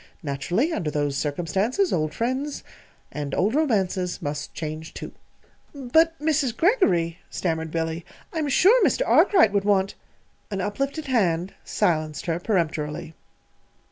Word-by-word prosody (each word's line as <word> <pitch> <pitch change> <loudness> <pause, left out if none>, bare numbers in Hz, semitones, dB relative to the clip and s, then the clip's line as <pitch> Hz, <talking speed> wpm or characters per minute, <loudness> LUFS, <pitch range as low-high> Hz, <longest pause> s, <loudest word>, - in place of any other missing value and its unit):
Naturally, 175 - 0
under 160 - -1
those 145 -1 -1
circumstances, 175 - 0
old 155 -2 0
friends 260 - -2 0.5
and 145 -1 -4
old 205 +5 +1
romances 195 - 0
must 145 0 -4
change, 155 0 -6
too." - - -7 0.6
"But, 320 +5 +2
Mrs. 290 -6 0
Greggory," 180 - +2
stammered 160 -2 -2
Billy, 165 +1 -2 0.3
"I'm 310 -3 -1
sure 415 - +5
Mr. - - +2
Arkwright 360 - +5
would 200 -1 +2
want 195 -1 +2 0.3
" - - -40
An 200 -2 -3
up 205 +4 -3
lifted 280 +3 -2
hand 190 - +1
silenced 155 -6 0
her 170 -1 -1
peremptorily. 160 -5 -2
190 Hz, 135 wpm, -24 LUFS, -, 0.6 s, sure